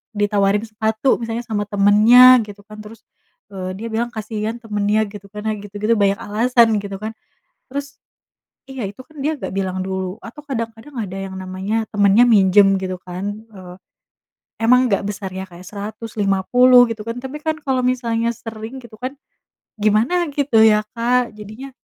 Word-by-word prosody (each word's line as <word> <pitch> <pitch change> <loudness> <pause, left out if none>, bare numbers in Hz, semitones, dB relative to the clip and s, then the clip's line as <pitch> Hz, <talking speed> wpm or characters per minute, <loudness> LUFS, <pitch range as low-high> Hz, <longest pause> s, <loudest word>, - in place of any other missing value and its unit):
ditawarin 205 0 +1
sepatu 220 +3 0
misalnya 230 +1 -4
sama 205 -3 -3
temannya 220 +5 +7
gitu 205 0 -11
kan. 215 +1 -13
Terus, 215 +1 -12 0.5
eee, 185 -1 -5
dia 225 +4 -6
bilang, 230 +2 -1
kasihan 220 0 -4
temannya 210 0 0
gitu 200 -1 -11
kan, 210 +1 -9
nah 220 - 0
gitu-gitu, 205 +2 -3
banyak 200 0 +3
alasan 230 +2 +3
gitu 200 -1 -6
kan. 220 +1 -4 0.6
Terus 280 +1 -6 0.7
iya, 265 -2 -7
itu 205 - -19
kan 310 - -21
dia 305 +1 -1
nggak - - -5
bilang 190 -1 -2
dulu 190 +2 -4
atau 235 +7 -11
kadang-kadang 230 0 -6
ada 195 -4 -4
yang 195 -1 -6
namanya 190 +4 -3
temannya 205 +3 +5
minjem 195 -3 +5
gitu 185 -1 -4
kan, 180 +2 -7 0.3
eee, 180 -2 -11 0.9
emang 250 +3 +4
nggak 195 - +2
besar 200 -2 -5
ya, 190 +1 -6
kayak 180 +1 -13
Rp150.000 215 +4 +2
gitu 225 - -5
kan, 230 - -4
tapi 265 +4 -7
kan 315 0 -1
kalau 265 -2 0
misalnya 235 -2 0
sering 225 +2 -8
gitu 235 -2 -14
kan 260 +3 -5 0.6
gimana 225 - +2
gitu 280 -6 +2
ya, 215 -1 +5
Kak, 245 +1 +1
jadinya 215 +6 -9
215 Hz, 160 wpm, -20 LUFS, 200-240 Hz, 0.9 s, temannya